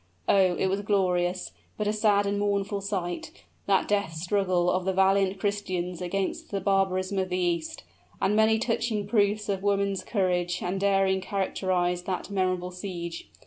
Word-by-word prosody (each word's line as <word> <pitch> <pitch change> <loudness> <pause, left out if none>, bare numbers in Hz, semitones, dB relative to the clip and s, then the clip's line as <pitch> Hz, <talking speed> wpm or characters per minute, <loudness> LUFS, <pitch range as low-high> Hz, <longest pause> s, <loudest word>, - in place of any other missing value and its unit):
Oh! 185 -2 +4
it - - 0
was 190 +1 0
a - - -3
glorious, 185 -3 0 0.3
but 210 - -1
a 210 - +1
sad 210 -2 +3
and 200 0 0
mournful 200 0 0
sight 185 -3 -3 0.4
that 195 -1 +3
death 200 -5 0
struggle 180 +1 +1
of 185 - 0
the 190 +1 0
valiant 195 0 +3
Christians 185 -3 -2
against 190 +2 -2
the 200 - -2
barbarism 195 0 +1
of 185 -1 -1
the 180 - -1
East. 170 -3 -1 0.4
And 205 - +2
many 220 +1 +4
touching 225 -2 -1
proofs 205 0 +1
of 195 -2 -1
woman's 200 -1 0
courage 180 -3 0
and 185 +2 -2
daring 195 -1 +2
characterized 185 -2 -1
that 190 +1 -3
memorable 185 -2 0
siege. 175 -2 -6
195 Hz, 165 wpm, -27 LUFS, 180-200 Hz, 0.4 s, Oh